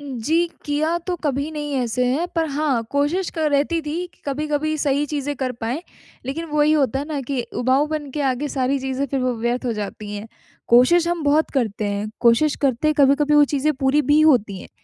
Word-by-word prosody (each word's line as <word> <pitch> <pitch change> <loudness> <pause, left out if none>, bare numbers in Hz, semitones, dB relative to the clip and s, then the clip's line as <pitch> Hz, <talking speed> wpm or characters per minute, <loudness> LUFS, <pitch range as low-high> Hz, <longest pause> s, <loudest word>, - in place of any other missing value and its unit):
जी, 290 +5 0 0.2
किया 305 +3 0
तो 360 - -1
कभी 280 +1 -1
नहीं 295 -1 -4
ऐसे 250 0 0
है 285 +8 0
पर 330 -1 +1
हाँ, 280 -4 0
कोशिश 295 +6 0
क - - -9
रहती 305 +2 +1
थी 300 +1 -4 0.2
कि - - -33
कभी-कभी 300 +2 -1
सही 285 0 +1
चीज़ें 290 0 -3
कर 255 -1 -2
पाएँ, 245 +8 -3 0.4
लेक़िन 295 +5 -3
वही 300 0 +3
होता 275 -5 +2
है 280 - -3
ना 295 -3 -2
कि 265 0 -3 0.2
उबाऊपन 290 +3 0
के 295 - -4
आगे 260 +3 -2
सारी 270 0 0
चीज़ें 265 +1 -2
फ़िर 270 0 -2
वो 255 -1 0
व्यर्थ 240 +3 -2
हो 240 - 0
जाती 210 0 -6
हैं। 205 +2 -7 0.4
कोशिश 325 +9 +5
हम 345 -2 -1
बहुत 300 +2 +2
करते 220 -6 -1
हैं, 205 +1 -3
कोशिश 240 +6 +4
करते 270 +2 +1
हैं 305 - +2
कभी-कभी 285 +2 +4
वो 295 0 +7
चीज़ें 290 +2 0
पूरी 270 +3 +3
भी 295 +3 +3
होती 230 -11 +3
हैं, - - -11
285 Hz, 205 wpm, -21 LUFS, 255-305 Hz, 0.4 s, वो